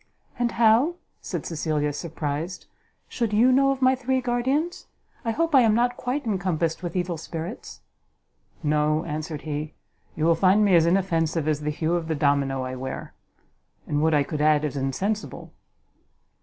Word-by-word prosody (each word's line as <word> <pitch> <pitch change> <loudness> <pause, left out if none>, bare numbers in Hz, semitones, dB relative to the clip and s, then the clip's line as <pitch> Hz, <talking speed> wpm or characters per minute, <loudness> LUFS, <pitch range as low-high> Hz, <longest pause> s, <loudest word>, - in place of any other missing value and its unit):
"And 240 -1 0
how," 235 +9 +4 0.3
said - - -5
Cecilia, 155 -2 -1
surprised, 160 +2 -4 0.4
"should 230 -4 -2
you 235 +5 +5
know 275 +1 +4
of 270 -1 -1
my 260 0 +5
three 260 0 0
guardians? 260 +8 -1 0.4
I 230 - -2
hope 330 +8 0
I 265 - +7
am 220 -3 +4
not 245 +1 +2
quite 255 +3 -3
encompassed 175 -6 -1
with 175 -1 -5
evil 175 -2 -2
spirits!" 165 +6 -7 0.8
"No," 150 +1 +1
answered 150 0 -4
he; 150 0 -4 0.4
"you 155 - -1
will 165 - +5
find 190 +5 +4
me 200 - +3
as 165 -1 +5
inoffensive 165 -4 +1
as 155 -2 +1
the 150 - -2
hue 155 +2 -1
of 170 -2 -1
the 160 - -1
domino 140 -2 +1
I 130 0 -4
wear; 130 +1 -6 0.7
and 145 0 -1
would 160 0 +3
I 145 - +3
could 150 +1 -4
add 150 0 +3
as 145 - -3
insensible!" 185 +11 -3
170 Hz, 170 wpm, -25 LUFS, 150-230 Hz, 0.8 s, I